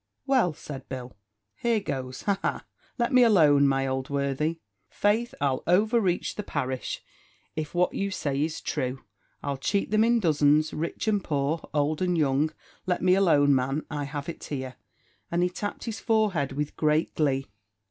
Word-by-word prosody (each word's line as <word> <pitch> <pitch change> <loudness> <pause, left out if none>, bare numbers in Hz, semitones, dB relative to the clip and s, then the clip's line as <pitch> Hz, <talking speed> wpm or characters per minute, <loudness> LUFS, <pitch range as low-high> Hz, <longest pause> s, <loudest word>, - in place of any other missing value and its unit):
"Well," 255 - +3
said 135 -3 -9
Bill, 125 -3 -6 0.4
"here 235 -2 +1
goes, 130 -9 -5
aha! 200 -1 -1 0.3
let 235 +1 0
me 255 - +7
alone, 155 -11 +6
my 135 0 +1
old 130 0 -2
worthy! 140 +3 -1 0.3
faith 220 +4 +1
I'll 135 -2 +1
overreach 200 0 +2
the - - -4
parish, 130 -9 -3 0.5
if 155 +1 -4
what 180 0 +2
you 200 - -1
say 140 -7 -2
is 155 0 -3
true. 130 -2 -3 0.4
I'll 140 -1 -2
cheat 200 +9 -1
them 215 0 +4
in 235 +1 +3
dozens, 155 -3 +3
rich 165 +7 -3
and 205 -3 +2
poor, 150 +2 -1
old 150 +1 0
and 180 -1 +1
young: 145 0 +2 0.4
let 180 -1 0
me 185 0 +5
alone, 155 -7 +4
man, 135 +3 0
I 145 -1 -2
have 145 +1 -5
it 170 - -6
here;" 130 -3 -5 0.5
and 170 +1 +1
he 180 - +2
tapped 205 +3 -5
his 225 -2 -4
forehead 205 - +1
with 150 +1 -3
great 155 +1 +1
glee. 135 -3 +1
155 Hz, 170 wpm, -27 LUFS, 140-195 Hz, 0.5 s, me